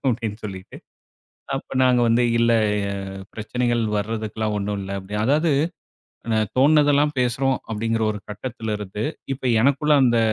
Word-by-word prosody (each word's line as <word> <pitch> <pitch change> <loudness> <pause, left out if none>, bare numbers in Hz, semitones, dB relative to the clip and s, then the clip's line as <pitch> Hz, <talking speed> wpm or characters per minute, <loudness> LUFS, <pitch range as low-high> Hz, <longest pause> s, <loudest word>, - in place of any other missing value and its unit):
அப்படின்னு 115 -4 -2
சொல்லிட்டு, 95 -2 -9 0.8
அப்ப - - -7
நாங்க 125 -1 +4
வந்து 115 +1 +3 0.2
இல்ல 115 0 +4 0.4
ஆ - - -2 0.4
பிரச்சனைகள் 120 +2 -1 0.2
வரதுக்கெல்லாம் 110 0 -2
ஒண்ணும் 100 0 -2
இல்ல. 95 - -7
அப்படி 95 +2 -8
அதாவது 155 +6 +2 1.1
தோண்ணதெல்லாம் 145 +1 +4
பேசுறோம் 125 +2 +1
அப்படிங்கிற 115 +1 -1
ஒரு 105 - -4
கட்டத்திலிருந்து, 105 -2 -5 0.3
இப்ப 135 0 -7 0.2
எனக்குள்ள 140 +4 +3
அந்த 120 -2 +4
115 Hz, 120 wpm, -22 LUFS, 105-130 Hz, 1.1 s, நாங்க